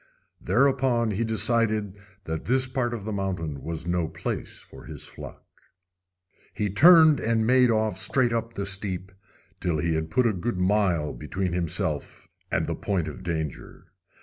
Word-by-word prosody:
Thereupon 130 -4 +2
he 105 +3 -1
decided 110 -3 +1 0.3
that 80 -3 -5
this 130 +2 +1
part 130 -2 -2
of 105 -4 -8
the 110 - -3
mountain 90 -8 -3
was 80 0 -5
no 85 -1 0
place 80 - -5
for - - -14
his - - -9
flock. - - -11 1.1
He 105 -2 -1
turned 160 - +7
and 115 0 +1
made 125 +1 +5
off 110 -1 0
straight 125 -3 +2
up 115 0 -3
the 100 - -3
steep, 95 -1 -2 0.5
till 85 -3 -1
he 80 +2 0
had 80 0 -2
put 125 +7 +2
a 115 - +3
good 95 +3 -3
mile 90 -5 +1
between 90 +4 -3
himself 85 -3 -2 0.2
and - - +1
the - - -2
point 90 -6 -2
of 75 - -7
danger. 80 -4 -5
100 Hz, 160 wpm, -26 LUFS, 85-115 Hz, 1.1 s, turned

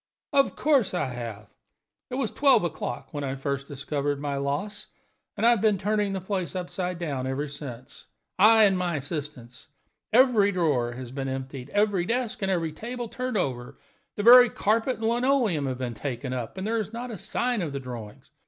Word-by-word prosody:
"Of 275 -1 +3
course 275 -11 +2
I - - 0
have! 115 -4 -6 0.6
It 255 - -4
was 260 -5 -1
twelve 270 -7 +4
o'clock 125 -7 -4
when 145 -1 -3
I 135 -1 -2
first 140 0 -3
discovered 145 0 -2
my 145 -1 -2
loss, 145 +10 -3 0.5
and 210 - +1
I 235 - +7
have 235 -5 +2
been 215 -2 +3
turning 210 +1 0
the 190 - -2
place 185 -4 -3
upside 180 0 -3
down 140 -7 -3
ever 135 +3 -2
since 130 -4 -9 0.3
I 220 +2 +7
and 195 -2 +5
my 180 -2 -1
assistants. 140 -4 -6 0.4
Every 225 -4 +5
drawer 145 -10 +1
has 125 -1 -8
been 135 0 -4
emptied, 130 0 -6
every 205 -2 +1
desk 240 -2 -1
and 170 -5 -1
table 240 +4 -5
turned 255 -2 -3
over, 125 -8 -3 0.4
the 205 - -3
very 245 +2 +9
carpet 225 +5 +1
and 220 +1 -1
linoleum 235 - +2
have 130 -1 -3
been 125 -2 -3
taken 125 +2 -4
up, 125 -3 -4
but 190 - -5
there 225 +2 0
is 215 0 -4
not 240 +2 -5
a 215 - -6
sign 245 -3 -1
of 160 -4 -3
the 140 - -4
drawings. 120 -5 -9
175 Hz, 190 wpm, -26 LUFS, 135-220 Hz, 0.6 s, very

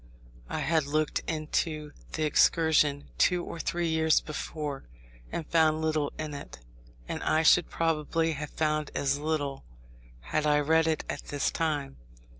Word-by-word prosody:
I - - -2
had 160 -3 +2
looked 155 +1 0
into 155 -1 -2 0.2
the 155 - -1
Excursion 150 -1 +3
two 180 -1 +3
or 170 - -7
three 170 +1 -1
years 160 -1 +3
before, 150 -2 -5 0.5
and 165 - -3
found 160 -1 +3
little 155 -2 0
in 155 -1 -4
it; 140 - -8 0.5
and - - -4
I 160 +1 +2
should 175 +1 +5
probably 165 0 0
have 150 -1 -4
found 155 -1 -1
as 140 0 +1
little, 145 -3 -2 0.6
had 150 - -1
I 150 0 +4
read 160 +2 +3
it 160 -1 0
at 145 - -5
this 145 -1 -1
time. 150 - -2
155 Hz, 150 wpm, -29 LUFS, 145-160 Hz, 0.6 s, should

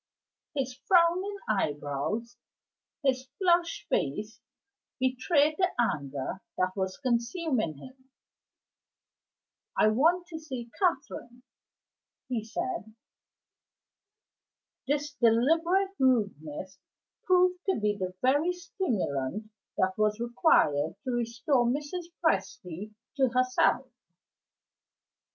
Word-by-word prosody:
His 265 -2 -1
frowning 355 +7 +2
eyebrows, 190 +5 -1 0.7
his 260 -1 +1
flushed 345 -3 +2
face, 210 - -2 0.6
betrayed 285 +4 +2
the 365 -7 +1
anger 145 - -1 0.2
that 185 0 0
was 190 -1 -2
consuming 240 - 0
him. 260 - -14 1.7
"I 215 - +5
want 330 +11 +3
to 320 -2 -6
see 255 -7 -7
Catherine," 265 -8 -1 0.9
he 235 -4 -1
said. 285 - -4 1.9
This 295 +1 -1
deliberate 325 - +3
rudeness 190 - 0 0.5
proved 365 0 +3
to 380 - +2
be 210 0 +1
the 185 -2 -4
very 290 +7 +3
stimulant 215 - -2 0.3
that 190 0 +1
was 215 0 +2
required 230 - +3
to 255 - -2
restore 240 +3 +1
Mrs. 290 +8 -2 0.2
Presty 195 - -1 0.2
to 265 -2 +4
herself. 255 +1 +2
250 Hz, 90 wpm, -29 LUFS, 210-320 Hz, 1.9 s, I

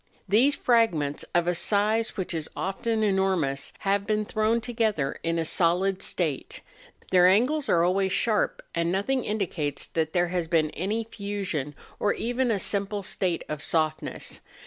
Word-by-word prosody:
These 245 +9 +3
frag¬ 230 -4 +3
ments, 145 -2 -3
of 175 -1 +3
a 175 - +1
size 215 +5 +1
which 190 -1 -2
is 160 -2 -3
often 220 +4 -1
enormous, 190 -9 +1
have 200 +1 0
been 215 -1 +1
thrown 215 +2 +1
together 220 - -1
in 165 0 -1
a 165 - 0
solid 180 +4 +2
state; 155 -7 -2 0.5
their 180 -1 +6
angles 255 +10 +2
are 170 -1 +4
always 190 +2 +2
sharp, 215 +1 +1
and 170 0 0
nothing 235 +7 0
indicates 180 -9 -2
that 160 -1 -2
there 175 -1 +2
has 175 -2 -1
been 160 -2 +2
any 210 +6 -2
fusion, 200 -10 -4 0.2
or 205 - +2
even 245 +2 -1
a 220 - +2
simple 200 +1 -1
state 185 -2 -1
of 150 -1 -4
softness. 155 -1 -2
190 Hz, 160 wpm, -26 LUFS, 165-215 Hz, 0.5 s, their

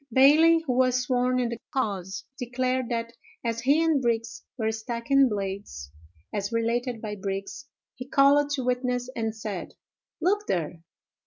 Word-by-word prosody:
"Bailey, 315 +6 +6
who 255 - 0
was 255 0 +3
sworn 250 0 +1
in 245 -2 0
the 235 -1 -5
cause, 195 -7 -2
declared 255 0 -1
that 230 -1 -2 0.3
as 230 0 -1
he 285 +6 +3
and 320 -4 +2
Brigs 230 -1 -1
were 220 -2 0
stacking 235 +4 +1
blades, 195 - -5 0.4
as 200 +1 -2
related 235 +1 -1
by 210 -1 -4
Brigs, 195 +7 -5 0.3
he 255 +1 -9
called 285 +1 +5
to 265 - -3
witness 250 0 -1
and 225 -1 -2
said, 210 -4 -6 0.4
'Look 410 +5 +1
there! 165 -1 -2
245 Hz, 150 wpm, -26 LUFS, 220-260 Hz, 0.4 s, Bailey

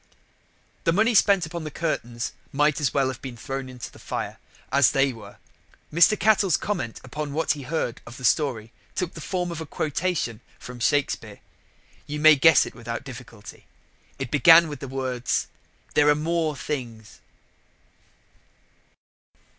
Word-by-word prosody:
The 165 - +3
money 220 +7 +3
spent 200 -4 +4
upon 165 +1 -6
the 155 - -5
curtains 125 -7 -3 0.2
might 150 +2 +2
as 135 -6 +1
well 135 0 +1
have 130 -1 -7
been 130 -3 -7
thrown 135 +3 -5
into 125 -1 -8
the - - -16
fire, - - -5 0.3
as 140 -2 +4
they 135 -1 +2
were. 105 -3 -12 0.6
Mr. 175 +6 +5
Cattell's 205 -5 +3
comment 180 - -3
upon 145 +3 -5
what 160 +2 +1
he 150 - -2
heard 135 -3 -3
of 120 +1 -10
the 125 - -5
story 120 -6 +1 0.2
took 180 -3 -2
the 165 - -9
form 180 +1 -2
of 165 -1 -5
a - - -5
quotation 150 -7 -2 0.2
from 125 0 -10
Shakespeare. 145 +3 0 0.7
You 150 0 -4
may 155 0 +8
guess 145 0 +6
it - - -9
without 115 +1 -6
difficulty. 120 -5 -11 0.5
It - - -5
began 165 +2 +7
with 145 -3 -7
the 140 - -6
words 130 -2 -2 0.5
"There 150 0 +4
are 150 - +5
more 160 0 -1
things." 120 -4 -6
145 Hz, 155 wpm, -25 LUFS, 125-165 Hz, 0.7 s, may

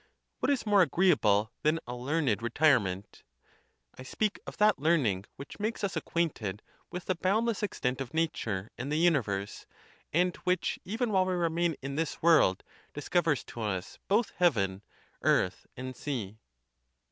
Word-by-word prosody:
What - - 0
is 280 -5 +1
more 205 -2 +5
agreeable 140 - +3
than 155 +2 +2
a 125 - -5
learned 130 -4 0
retirement? 115 -7 +1 0.8
I - - -6
speak 205 +11 -2
of - - -8
that 210 -4 +4
learning 135 - +2
which 140 - -10
makes 215 +2 -2
us 200 - -1
acquainted 110 - -2 0.3
with 180 - -6
the 185 - +1
boundless 210 +5 0
extent 130 -10 -2
of 130 - -5
nature 115 -11 -2
and 135 +4 -4
the 150 - +1
universe, 120 - 0 0.4
and 180 +2 +2
which 180 0 -1
even 225 +4 -2
while 190 -2 +3
we 185 - 0
remain 170 -1 +1
in 140 +1 -4
this 160 -1 -2
world 155 - +4 0.3
discovers 160 0 +1
to 120 - -9
us 95 -3 -3
both 215 +3 +2
heaven, 100 - +2 0.4
earth, 90 - +1
and 130 0 -6
sea. 110 -7 -4
155 Hz, 150 wpm, -30 LUFS, 115-180 Hz, 0.8 s, more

